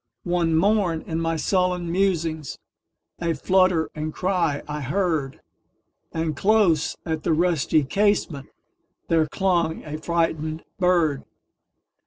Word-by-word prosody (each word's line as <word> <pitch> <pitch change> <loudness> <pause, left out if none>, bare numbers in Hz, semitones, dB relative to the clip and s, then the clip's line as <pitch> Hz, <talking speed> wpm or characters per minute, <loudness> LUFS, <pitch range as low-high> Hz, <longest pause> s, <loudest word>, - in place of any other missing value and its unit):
One 175 -2 +1
morn, 185 -2 +2
in 165 0 -3
my 165 0 0
sullen 180 0 0
musings,A 170 -2 -3
flutter 185 +1 +2
and 155 0 -4
cry 175 -5 -1
I 150 0 -4
heard; 150 -2 -1 0.7
And 160 -2 -2
close 190 -3 +2
at 160 -2 -2
the 165 - +1
rusty 160 -4 +2
casementThere 165 -2 -2
clung 175 -2 0
a 155 0 -5
frightened 160 -1 -1 0.2
bird. 170 -6 +2
165 Hz, 105 wpm, -23 LUFS, 155-180 Hz, 0.7 s, morn